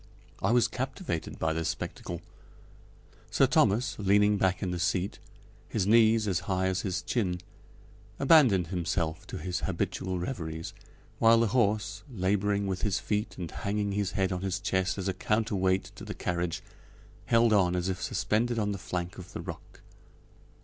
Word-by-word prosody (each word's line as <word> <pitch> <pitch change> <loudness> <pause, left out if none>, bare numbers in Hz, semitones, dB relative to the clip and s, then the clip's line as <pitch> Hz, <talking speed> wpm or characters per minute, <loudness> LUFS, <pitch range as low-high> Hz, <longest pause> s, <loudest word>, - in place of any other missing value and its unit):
I - - +1
was 120 0 +4
captivated 130 - -4
by 80 0 0
this 80 0 -1
spectacle. 85 -1 -5 1.1
Sir - - +4
Thomas, 110 +5 +2
leaning 105 +1 +4
back 95 0 +1
in 90 - -1
the 90 - -3
seat, 90 +3 0 0.5
his 100 -4 0
knees 110 0 +5
as 90 -4 +1
high 95 0 +1
as 95 -1 0
his 95 -2 -2
chin, 90 -7 -1 0.8
abandoned 130 - +5
himself 85 -3 -2
to - - -6
his 90 +2 -3
habitual 95 +1 -2
reveries, 80 -6 -4 0.5
while 115 0 +6
the 115 -2 +2
horse, 110 -3 +1
laboring 100 0 +1
with 95 -2 -2
his 100 -5 +1
feet 105 +1 -2
and 85 -3 -5
hanging 100 0 -2
his 100 -1 -1
head 95 -1 +1
on 90 -1 -2
his 95 -1 -1
chest 95 -2 0
as 95 -1 -3
a 95 - +1
counter 105 +4 0
weight 95 0 +1
to - - -10
the - - -6
carriage, 85 -1 -2 0.6
held 115 -1 +4
on 90 -3 +3
as 90 0 -1
if 95 0 -2
suspended 120 +3 0
on 105 -2 0
the 100 - -4
flank 90 +1 -4
of 90 0 -11
the - - -5
rock. - - -9
95 Hz, 170 wpm, -29 LUFS, 90-105 Hz, 1.1 s, while